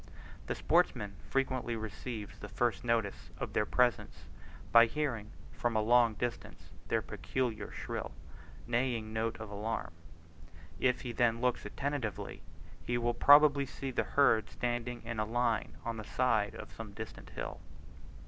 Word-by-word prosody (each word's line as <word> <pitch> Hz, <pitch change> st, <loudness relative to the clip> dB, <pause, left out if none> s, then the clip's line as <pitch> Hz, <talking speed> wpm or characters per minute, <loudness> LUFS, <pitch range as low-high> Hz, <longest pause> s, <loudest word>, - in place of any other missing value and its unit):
The -, -, -1 dB
sportsman 105 Hz, -1 st, +2 dB, 0.2 s
frequently 130 Hz, -3 st, 0 dB
receives 110 Hz, -1 st, -6 dB
the 105 Hz, -, -8 dB
first 120 Hz, +2 st, 0 dB
notice 115 Hz, -4 st, 0 dB
of -, -, -5 dB
their 105 Hz, -, +1 dB
presence, 125 Hz, -1 st, +1 dB, 0.5 s
by 115 Hz, 0 st, +8 dB
hearing 120 Hz, -6 st, -2 dB, 0.2 s
from 120 Hz, -1 st, -1 dB
a 110 Hz, -, +3 dB
long 120 Hz, 0 st, +5 dB
distance 120 Hz, +1 st, -5 dB, 0.2 s
their -, -, +1 dB
peculiar 125 Hz, -4 st, -2 dB
shrill -, -, -4 dB, 0.5 s
neighing 120 Hz, -2 st, 0 dB
note 110 Hz, +1 st, -1 dB
of 110 Hz, -2 st, -7 dB
alarm. 105 Hz, -2 st, -3 dB, 0.9 s
If 125 Hz, -1 st, +2 dB
he 125 Hz, -, -4 dB
then 115 Hz, 0 st, +2 dB
looks 125 Hz, 0 st, 0 dB
attentively, 140 Hz, -6 st, -3 dB, 0.4 s
he 120 Hz, -, 0 dB
will 120 Hz, 0 st, +1 dB
probably 145 Hz, +2 st, +7 dB
see 135 Hz, 0 st, -5 dB
the -, -, +1 dB
herd 125 Hz, -6 st, +5 dB
standing 120 Hz, 0 st, -3 dB
in 115 Hz, -1 st, -3 dB
a -, -, +3 dB
line 115 Hz, 0 st, 0 dB
on 115 Hz, -1 st, -2 dB
the 110 Hz, -, -5 dB
side 105 Hz, -2 st, +1 dB
of -, -, -9 dB
some -, -, -8 dB
distant -, -, -8 dB
hill. -, -, -4 dB
120 Hz, 150 wpm, -33 LUFS, 110-125 Hz, 0.9 s, by